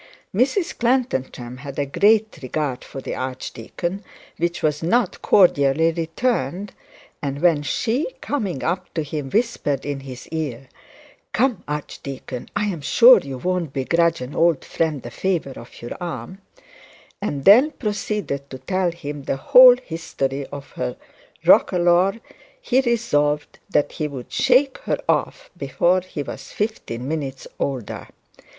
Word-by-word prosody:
Mrs 270 - +1
Clantantram 135 - -1
had 140 0 -8
a 145 - 0
great 215 +9 +2
regard 135 0 -3
for 135 - -8
the - - -5
archdeacon, 130 - -5 0.3
which 170 +1 -2
was 150 -1 +1
not 200 +5 +1
cordially 160 -3 +4
returned; 175 - -2 0.5
and 140 -1 -3
when 165 -3 +3
she, 235 - 0
coming 200 - -3
up 180 +2 -2
to 160 - 0
him, 150 -2 -5
whispered 205 - 0
in 145 -1 -3
his 130 -2 -9
ear, 135 -6 -4 0.6
'Come, 250 -4 +1
archdeacon, 140 -3 -6
I'm 200 -7 -1
sure 245 - +7
you 135 -2 -7
won't 180 0 -2
begrudge 165 +3 +1
an 125 +3 -6
old 165 -4 +2
friend 155 -5 -1
the 120 - -7
favour 170 -4 -1
of 120 0 -12
your 120 - -5
arm,' 175 - -6 0.8
and 145 -9 -3
then 245 +10 +8
proceeded 210 - -3
to 130 - -7
tell 180 +8 0
him 145 -4 -7
the - - -1
whole 250 - +8
history 140 - -4
of 140 -1 -9
her 60 - -4 0.5
roquelaure, 180 +4 +4 0.4
he 265 - +2
resolved 150 - 0
that 145 -1 +1
he 155 - -3
would 135 -4 -8
shake 265 +1 +3
her - - -1
off - - -1
before 185 +2 +1
he 175 -5 -6
was - - -8
fifteen 135 - -3
minutes 140 -4 -4
older. 130 -6 -3
160 Hz, 140 wpm, -22 LUFS, 135-205 Hz, 0.8 s, then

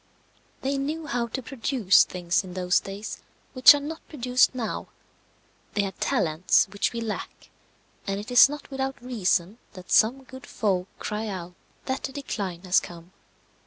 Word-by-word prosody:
They 275 +1 -1
knew 305 +4 -3
how 240 -4 -1
to 260 +3 -5
produce 240 -6 +3
things 180 +3 -1
in 185 -1 -10
those 180 -1 +2
days 200 +2 -7 0.3
which 255 +2 +9
are - - -1
not 310 +3 -6
produced 255 -3 +2
now; 230 -4 -4 0.9
they 205 - +2
had 195 -2 -6
talents 160 +2 +2
which 200 - 0
we 235 - -4
lack, 220 -2 -6 0.6
and 195 0 -1
it 210 +4 -8
is 245 +2 +8
not 295 0 -8
without 270 0 -3
reason 215 -4 -1
that 185 -3 -12
some 255 +5 +4
good 260 -1 -12
folk 190 -4 -1
cry 215 +1 -4
out 180 -3 -6 0.3
that 260 0 -2
the 270 - -4
decline 200 -11 -5
has 185 0 +4
come. 170 0 -11
225 Hz, 160 wpm, -26 LUFS, 185-265 Hz, 0.9 s, which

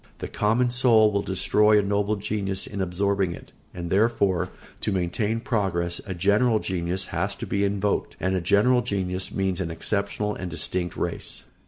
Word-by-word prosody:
The - - -5
common 120 +4 +1
soul 115 -4 +5
will 100 -1 +1
destroy 105 +3 +3
a 105 - +3
noble 100 +1 +1
genius 100 -2 -2
in 100 -1 -5
absorbing 95 0 0
it, - - -14 0.2
and 85 -1 -6
therefore, 100 -4 +2 0.3
to - - -1
maintain 100 +5 0
progress, 95 -7 -1
a 95 - -4
general 105 +6 +3
genius 90 -1 -2
has - - -1
to - - -6
be 100 0 0
invoked; 100 0 0
and 95 +2 0
a 90 - 0
general 105 +8 +4
genius 95 -3 -2
means 95 -2 -1
an 85 - -2
exceptional 100 +4 -1
and 90 -3 -5
distinct 90 +1 -2
race. - - -3
100 Hz, 170 wpm, -25 LUFS, 95-105 Hz, 0.3 s, soul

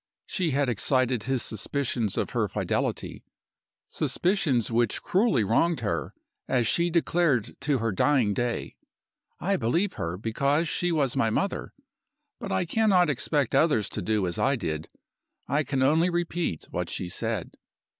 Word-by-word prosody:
She 180 -4 -1
had 140 -1 +1
excited 125 +1 +1
his 130 +1 0
suspicions 115 -1 -2
of - - -1
her - - 0
fidelity - - -2 0.6
suspicions 155 - 0
which 115 -1 +1
cruelly 190 - +2
wronged 155 - +2
her, 105 - -2 0.3
as 125 -3 +1
she 170 +8 +2
declared 165 -7 +1
to 140 0 +1
her 115 -1 -1
dying 120 +1 +2
day. 120 +2 -3 0.6
I 195 +4 +1
believed 170 - 0
her, 85 +2 -3
because 140 - 0
she 175 +3 0
was 140 -6 +1
my 115 - +2
mother. 195 - -2 0.7
But 195 - -5
I 190 -1 +1
cannot 185 -3 +3
expect 140 0 0
others 145 - +3
to - - -4
do 105 +1 0
as 85 -1 -3
I 140 - +3
did 80 -8 -4 0.6
I 145 +3 +1
can 135 -2 0
only 160 +6 +3
repeat 175 - -2
what - - -3
she 90 - -3
said. 90 - -3
135 Hz, 150 wpm, -27 LUFS, 115-170 Hz, 0.7 s, cannot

